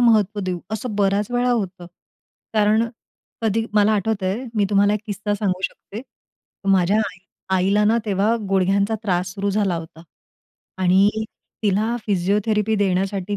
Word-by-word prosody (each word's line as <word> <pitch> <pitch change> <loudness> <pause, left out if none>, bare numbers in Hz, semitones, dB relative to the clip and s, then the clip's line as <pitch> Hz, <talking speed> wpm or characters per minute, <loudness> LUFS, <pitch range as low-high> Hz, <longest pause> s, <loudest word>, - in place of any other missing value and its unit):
महत्त्व 215 -3 +3
देऊ?" 185 -2 -2
असं 220 +1 -3
बऱ्याच 200 +1 +1
वेळा 245 0 +1
होतं. 190 -6 -2 0.7
कारण 215 +2 +3 0.6
कधी 225 +1 +1
मला 210 +1 +4
आठवतंय, 205 +2 -1
मी 210 -2 +2
तुम्हाला 205 +1 +4
एक 210 - -2
किस्सा 205 0 -2
सांगू 190 -3 -1
शकते. 205 +2 -5 0.7
माझ्या 190 +2 +3
आई 190 -4 -4 0.4
आईला 200 +3 +2
ना, 225 +2 +3
तेव्हा 210 +2 +1
गुडघ्यांचा 195 +2 +2
त्रास 180 -3 -1
सुरू 200 0 -1
झाला 200 -3 +1
होता 165 0 -9 0.8
आणि 190 +2 +5 0.5
तिला 215 +3 +1
फिजिओथेरपी 210 +3 +1
देण्यासाठी 195 0 0
205 Hz, 135 wpm, -21 LUFS, 190-215 Hz, 0.8 s, आणि